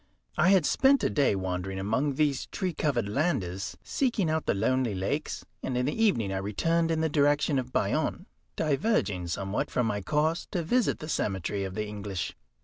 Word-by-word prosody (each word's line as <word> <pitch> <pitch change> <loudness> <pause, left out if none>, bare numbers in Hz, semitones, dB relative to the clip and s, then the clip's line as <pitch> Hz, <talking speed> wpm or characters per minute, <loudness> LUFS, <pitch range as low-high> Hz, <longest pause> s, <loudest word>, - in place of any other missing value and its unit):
I 165 +4 +4
had 190 -5 +5
spent 270 - +4
a - - +2
day 140 -8 +3
wandering 95 0 -3
among 120 +9 0
these 145 -2 +1
tree 185 -3 -3
covered 125 -10 0
landes, 100 - -1
seeking 230 - 0
out 160 0 -1
the - - +2
lonely 120 +1 +1
lakes, 95 +1 -2 0.2
and 125 - -2
in 125 - +1
the 145 - 0
evening 115 - +2
I - - -1
returned 165 +13 0
in 160 -1 +1
the 160 - +2
direction 145 -1 +2
of 125 0 -5
Bayonne, - - 0 0.3
diverging 140 - 0
somewhat 95 +3 -2
from 125 - 0
my 105 -2 -1
course 155 - 0
to 175 -3 0
visit 240 +8 +2
the 155 - -8
cemetery 100 - -1
of 95 -1 -6
the 105 - -2
English. 100 -3 -4
130 Hz, 185 wpm, -28 LUFS, 100-160 Hz, 0.3 s, had